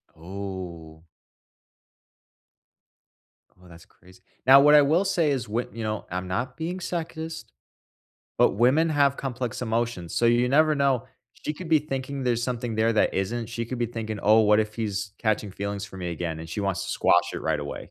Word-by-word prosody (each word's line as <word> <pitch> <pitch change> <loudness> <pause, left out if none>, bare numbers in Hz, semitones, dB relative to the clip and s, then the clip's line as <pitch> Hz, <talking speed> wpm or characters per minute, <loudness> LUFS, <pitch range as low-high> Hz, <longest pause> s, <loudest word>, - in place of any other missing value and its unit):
Oh. 85 -3 -8 2.6
Oh, 90 - -17
that's 85 0 -15
crazy. 90 +1 -21 0.2
Now, 135 +1 +9
what 150 +1 +7
I 145 - +8
will 160 +7 +2
say 165 -6 +1
is 125 -6 -2
what, 115 -1 -3
you 115 - -5
know, 110 -1 -3
I'm 90 0 -3
not 125 +8 -3
being 175 +3 -4
sexist. 165 -2 -5 0.9
But, - - +5
women 130 +10 +3
have 140 -2 +2
complex 125 -2 -4
emotions, 115 -7 -2
so 120 - +1
you 120 +1 +3
never 155 +3 +4
know. 135 -3 +1 0.3
She 150 - -5
could 165 +2 -9
be 160 -1 +5
thinking 135 -1 -4
there's 120 -1 +1
something 120 -2 -3
there 110 +1 +2
that 110 - +2
isn't. 115 +4 -2
She 115 0 -4
could 125 +1 -5
be 120 - 0
thinking, 110 -2 -5
oh, 110 +2 +6
what 105 0 +4
if 105 0 -1
he's 105 -3 -3
catching 110 -2 -1
feelings 100 0 -4
for 95 - -11
me 90 -2 -4
again, 80 -1 -4
and 80 - -9
she 85 - -4
wants 95 -3 -1
to - - -5
squash - - +2
it - - -4
right - - -1
away. - - -7
115 Hz, 190 wpm, -25 LUFS, 100-140 Hz, 2.6 s, Now